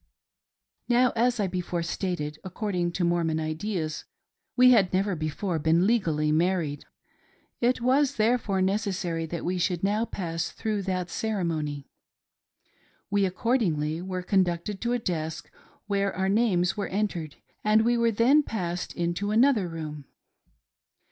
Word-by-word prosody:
Now, 245 +1 +4
as 240 +1 +2
I 205 - +2
before 180 -2 -2
stated, 165 -4 -3
according 185 -2 -2
to 180 - -1
Mormon 170 -2 +1
ideas, 155 0 -3 0.5
we 255 0 +7
had 200 -7 +4
never 195 +1 +1
before 160 +3 -2
been 160 +4 +3
legally 165 -9 +1
married. 160 -3 0 0.7
It 245 +1 +1
was 265 +3 +2
therefore 215 -3 +1
neces 200 +1 0
sary 165 -3 -3
that 170 +1 -5
we 180 +1 -1
should 175 0 0
now 210 +3 +1
pass 165 -5 -3
through 215 -2 -3
that 180 -1 -2
ceremony. 160 -9 -2 1.2
We 200 -1 +3
accordingly 175 - 0
were 185 0 -4
conducted 185 +1 0
to 240 0 0
a - - +2
desk 160 -8 -4 0.3
where 200 -1 0
our 190 +1 0
names 195 -5 +2
were 205 -2 -2
entered 185 -7 -2 0.3
and 215 +1 +4
we 240 +1 +3
were 235 0 +3
then 235 +7 +4
passed 180 -9 -4
into 175 +4 -1
another 225 -2 +3
room. 155 -3 -6
185 Hz, 140 wpm, -27 LUFS, 170-215 Hz, 1.2 s, we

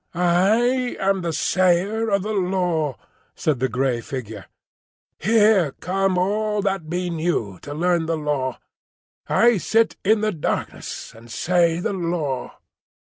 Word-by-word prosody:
"I 220 +9 +2
am 195 0 +1
the 170 -1 -2
Sayer 185 +7 +1
of 200 -2 +1
the 215 +1 -3
Law," 180 - 0 0.4
said 150 -5 0
the 130 +1 0
grey 125 0 0
figure. 110 -6 -7 0.7
"Here 205 - +3
come 190 +1 -1
all 210 +2 0
that 195 -5 -2
be 180 +1 -2
new 155 - -2
to 145 - -8
learn 170 0 +1
the 165 -1 0
Law. 145 -4 -2 0.7
I 235 -3 +4
sit 225 +5 +1
in 215 +2 +3
the 215 0 +1
darkness 165 -6 -4
and 115 +1 -15
say 170 +4 +1
the 180 - -2
Law." 165 -7 -3
175 Hz, 135 wpm, -22 LUFS, 150-200 Hz, 0.7 s, I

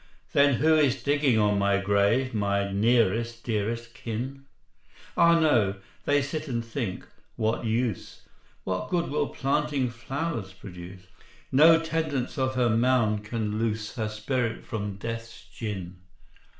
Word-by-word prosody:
'" - - -35
"Then 140 -1 +5
who 160 +6 +3
is 145 -4 +2
digging 145 -4 +2
on 105 -1 +3
my 100 0 +3
grave, 100 +6 +2
My 100 -2 0
nearest 115 +2 +1
dearest 115 +1 -2
kin?" 125 +3 -5 0.7
"Ah, 170 0 +5
no: 115 -11 +3 0.3
they 145 -1 +3
sit 155 +2 -4
and 115 -3 -2
think, 115 -5 -4 0.3
'What 110 +2 -1
use! 115 -2 -2 0.4
What 95 +7 -3
good 170 -3 0
will 145 0 0
planting 140 -2 0
flowers 125 - -4
produce? 90 -1 -11 0.5
No 160 +4 +7
tendance 155 -5 -2
of 130 0 0
her 125 -2 +2
mound 115 -3 +2
can 110 -1 -3
loose 110 -1 -2
Her 110 -3 -2
spirit 115 +2 -2
from 105 -5 -4
Death's 115 +2 -7
gin.'" 95 -5 -5
115 Hz, 135 wpm, -27 LUFS, 105-135 Hz, 0.7 s, No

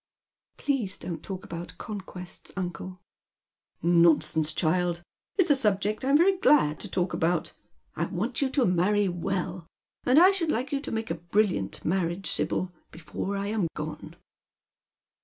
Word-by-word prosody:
" - - -67
Please 245 -10 0
don't 170 -3 -5
talk 190 -1 -6
about 170 0 -7
conquests, 185 -4 -7
uncle." 185 0 -5 0.5
" - - -41 0.2
Nonsense, 160 -1 +3
child! 175 +2 0 0.3
It's 365 -5 +4
a - - +6
subject 210 -3 0
I'm 275 +2 +5
very 375 +3 +4
giad 155 - +4
to - - -2
talk 180 -1 -1
about. 170 0 0 0.4
I - - 0
want 220 +8 -2
you 275 - +2
to 265 -2 +2
marry 195 +3 +2
well. 180 0 -3 0.4
I 325 +10 +7
should 360 -5 -1
like 255 0 -1
you 280 - 0
to - - -6
make 225 0 -2
a - - -4
brilliant 195 - +1
marriage, 175 +1 0
Sibyl, 185 - -1 0.2
before 175 +5 -5
I 200 - -2
am 210 -5 0
gone." 150 +1 -6
190 Hz, 155 wpm, -27 LUFS, 175-230 Hz, 0.5 s, I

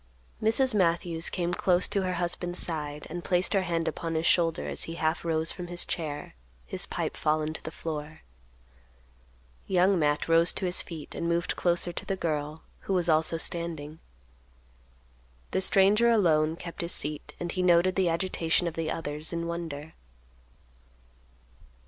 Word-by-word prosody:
Mrs. 235 +4 +3
Matthews 170 -3 +1
came 175 -1 -2
close 180 0 +3
to 200 - 0
her 185 -1 -1
husband's 175 0 -2
side, 150 -3 -2
and 175 +1 -6
placed 180 0 +1
her 195 - +3
hand 170 -2 -1
upon 165 -1 -3
his 160 +1 0
shoulder 165 -1 +2
as - - 0
he 165 - -6
half 160 0 -1
rose 160 -1 +3
from 180 -1 -7
his 175 0 -4
chair, 150 -4 -4 0.3
his - - -1
pipe - - -3
fallen 155 0 0
to - - -6
the - - -6
floor. 155 -1 -6 1.5
Young 185 0 +3
Matt 145 -1 +1
rose 165 +1 +4
to 190 - -2
his 180 0 +1
feet 160 -4 -8
and 170 - -2
moved 170 0 0
closer 175 0 +2
to - - -4
the 195 - -2
girl, 155 -3 -3 0.3
who - - +2
was 175 -2 +1
also 160 +1 +3
standing. 160 -2 -3 1.5
The 190 - 0
stranger 200 +5 +5
alone 160 -8 +3
kept 170 0 -6
his 170 0 +1
seat 150 +1 -2
and 175 -1 -3
he 185 - -2
noted 180 +1 +4
the 185 -3 +2
agitation 170 0 0
of 170 - -3
the 165 -1 -3
others 150 -1 -4
in 170 -1 -3
wonder. 165 -3 -5
170 Hz, 165 wpm, -28 LUFS, 160-180 Hz, 1.5 s, stranger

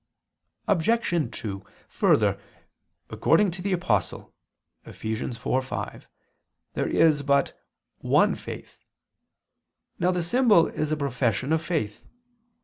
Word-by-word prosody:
Obj. 190 -3 +1
2: 100 -2 -5 0.3
Further, - - +2 0.7
according 185 +3 +3
to 175 +2 -8
the 200 +2 -2
Apostle 145 - -1 0.5
(Eph. - - -13
4:5) 120 +4 -3 0.7
there - - -1
is 155 -3 +3
but 140 0 +2 0.5
"one - - +3
faith." - - -9 1.2
Now 175 - +2
the 180 -1 0
symbol 210 -2 +4
is 155 0 -3
a 155 - 0
profession 130 -1 0
of 160 - +1
faith. 155 - -3
155 Hz, 105 wpm, -26 LUFS, 130-180 Hz, 1.2 s, symbol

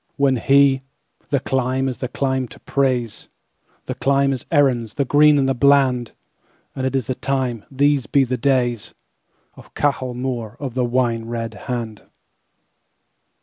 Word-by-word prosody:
When 140 -2 +2
he—"The 135 +1 0
climeIs 130 0 -1
a 125 - -1
clime 130 0 -1
to - - -14
praise, 125 -5 -1 0.6
The - - -3
clime 140 0 +1
is 130 - -7
Erin's, 125 -7 +2
the 140 - 0
green 150 +2 +5
and 135 -2 0
bland; 135 -4 +3 0.6
And 130 -1 -1
it 130 - -3
is 130 -4 0
the 130 - -2
time, 130 -4 -2
These 140 -2 +1
be 140 - +3
the 130 0 -1
days, 125 -3 0 0.6
Of - - -17
Cahal 130 -4 -1
Mór 120 -4 -4
of 135 -4 -5
the 125 0 0
Wine 120 -2 0
red 115 -1 -4
Hand." 115 -2 -6
130 Hz, 145 wpm, -20 LUFS, 120-140 Hz, 0.6 s, green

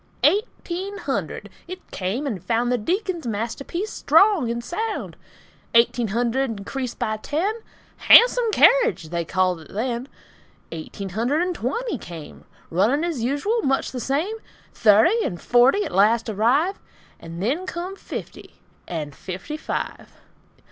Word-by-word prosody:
EIGHTEEN 395 -1 0
HUNDRED; - - -3 0.2
It 370 +1 -10
came 200 +10 -2
and 210 -11 -4
found 240 +1 0
The 250 - +1
Deacon's 350 - -2
masterpiece 235 - -3
strong 390 - +4
and 235 0 -3
sound. 435 - -4 0.6
Eighteen 235 0 +4
hundred 235 +2 0
increased 255 +4 -5
by 215 0 -1
ten; 320 - -1 0.5
"Hahnsum 485 -1 +7
kerridge" 480 - +4
they 170 0 -2
called 185 +1 0
it 155 - -14
then. 235 +4 -2 0.6
Eighteen 165 +4 -6
hundred 240 - 0
and 360 0 -1
twenty 305 - -3
came; 165 -3 -10 0.3
Running 220 - +2
as 335 -8 -2
usual; 290 - 0
much 270 -7 0
the 255 - -5
same. 300 - -1 0.4
Thirty 230 - +4
and 175 - -3
forty 250 +12 +4
at - - -5
last 220 +5 +3
arrive, 255 - +1 0.4
And 165 +1 -9
then 285 - -1
come 365 +2 -5
fifty, - - -8 0.3
and 150 -4 -4
FIFTY 190 - -6
FIVE. 310 - -5
250 Hz, 135 wpm, -23 LUFS, 215-360 Hz, 0.6 s, Hahnsum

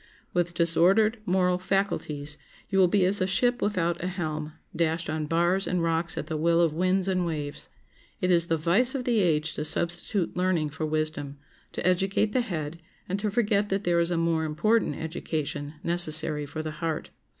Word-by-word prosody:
With 175 -1 0
disordered 185 +7 +3
moral 180 0 +2
faculties 180 -7 -2 0.3
you 195 - +2
will 185 - +6
be 185 +1 +2
as 195 +2 +1
a 185 - +2
ship 245 +6 +1
without 175 -5 0
a - - -1
helm, 155 -4 -4 0.2
dashed 165 0 0
on 155 -1 -3
bars 175 +4 +1
and 180 -1 0
rocks 165 0 -1
at - - -3
the 160 - -3
will 165 +2 +2
of 165 -3 +3
winds 185 +3 +1
and 185 -1 +1
waves. 150 -4 -4 0.5
It 180 - +1
is 170 -1 +3
the 165 - +1
vice 195 - +2
of 260 - -2
the 240 -3 +1
age 160 -4 +1
to 150 - -3
substitute 175 +4 -1
learning 180 -5 0
for 155 +1 -3
wisdom, 155 -2 -3 0.4
to - - -4
educate 195 +3 +1
the 255 - +2
head, 165 -6 -5 0.3
and 195 +2 -2
to 210 +1 -1
forget 205 -2 +1
that 195 +1 -1
there 175 -1 +2
is 170 0 +1
a 175 - 0
more 165 -1 +1
important 160 +4 +1
education 155 -2 -4
necessary 155 -3 +4
for 155 +2 -5
the 155 - -4
heart. 165 -2 -3
170 Hz, 190 wpm, -27 LUFS, 155-190 Hz, 0.5 s, will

